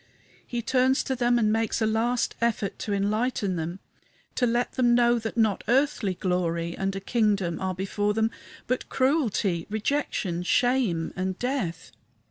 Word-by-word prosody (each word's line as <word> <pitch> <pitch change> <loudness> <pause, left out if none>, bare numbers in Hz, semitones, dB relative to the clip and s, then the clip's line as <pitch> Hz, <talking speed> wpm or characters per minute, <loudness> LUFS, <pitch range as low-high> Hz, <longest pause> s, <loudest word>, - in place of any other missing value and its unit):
He 240 -1 -3
turns 260 +2 +2
to 265 - -2
them 240 -1 +2
and 215 -2 +2
makes 225 0 0
a 220 - +2
last 230 +3 +1
effort 225 -4 -1
to 210 - -4
enlighten 205 0 0
them 170 +3 -4 0.5
to 245 - +1
let 240 +1 0
them 240 -2 +3
know 240 0 +4
that 220 +1 -5
not 220 -3 +2
earthly 245 -6 +2
glory 170 -2 -1
and 195 0 -2
a - - -2
kingdom 200 -5 0
are 190 -1 -1
before 205 +2 -1
them, 220 0 +1 0.3
but 255 +1 -2
cruelty, 225 - +1
rejection, 215 -6 -1
shame, 225 -5 +1
and 185 0 -2
death. 245 -11 -3
220 Hz, 155 wpm, -26 LUFS, 190-245 Hz, 0.5 s, know